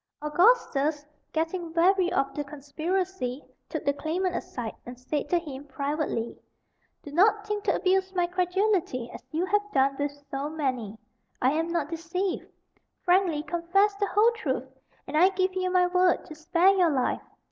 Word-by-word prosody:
Augustus, 300 - +2 0.3
getting 330 +1 -2
weary 360 +2 +3
of 275 0 0
the 295 - -3
conspiracy, 300 0 -3 0.2
took - - -4
the 280 - +3
claimant 345 +5 -1
aside, 250 -12 -4
and 245 0 -9
said 285 +3 -3
to 350 - +3
him 285 -5 -6
privately: 280 -4 -2 0.7
"Do 290 - -9
not 415 +6 +3
think 420 0 -3
to - - +3
abuse 380 0 +1
my 355 -1 +3
credulity 360 - 0
as - - -8
you 320 +6 -1
have 415 +2 +2
done 275 0 +3
with 285 0 -1 0.2
so 275 +2 -2
many. 255 -9 -3 0.4
I 255 - +3
am 320 +2 0
not 335 -2 -1
deceived. 350 +3 -2 0.6
Frankly 355 -4 +3
confess 355 +5 +2
the 405 0 0
whole 425 +5 +4
truth, 265 - -3 0.4
and - - -6
I 355 +5 +6
give 375 -1 0
you 370 0 -1
my 365 0 +4
word 360 0 +2
to - - -9
spare 335 +4 +3
your 365 -3 +4
life. 265 -4 0
335 Hz, 165 wpm, -27 LUFS, 285-370 Hz, 0.7 s, I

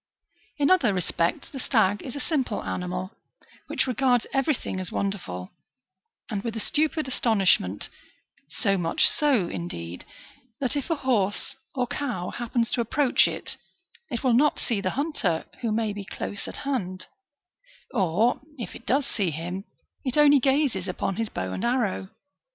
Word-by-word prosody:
^3 - - +1
In 280 - +5
other 250 - +4
respects 170 -1 0
the 270 - -7
stag 210 -5 +2
is 260 - -7
a - - -3
simple 275 -9 -1
animal, 180 +1 -3 0.6
which - - +1
regards 250 -1 +2
every 275 +2 +3
thing 190 - -4
as 185 -2 -4
wonderful, 95 - -3 0.8
and 205 -2 -3
with 230 -1 -3
a - - -2
stupid 310 +5 +1
astonishment; 195 - +2 0.6
so 195 -1 +1
much 165 -1 +3
so, 270 - +3
indeed, 85 - -5 0.6
that 265 +1 0
if 285 +2 -2
a 330 - +2
horse 240 -5 0 0.2
or 250 -2 +1
cow 245 -9 -3
happens 235 -1 -1
to 245 - +2
approach 255 +3 +3
it, - - -3 0.5
it 240 -1 -3
will 255 -2 +4
not 290 +5 +4
see 220 -4 -1
the 185 - 0
hunter, 280 - 0 0.2
who 230 -3 0
may 215 -1 0
be 205 0 -5
close 195 +1 -5
at - - -6
hand, 185 -10 -1 0.9
or, 200 +4 +2 0.2
if 235 - -5
it - - -12
does 270 +3 +3
see 200 -9 0
him, 175 +5 -4 0.4
it 255 -3 -1
onlj 290 -2 +7
gazes 270 -8 +2
upon 185 +1 -2
his 225 -2 -1
bow 95 0 -3
and - - -3
arrow. 235 -6 0
225 Hz, 160 wpm, -26 LUFS, 185-265 Hz, 0.9 s, onlj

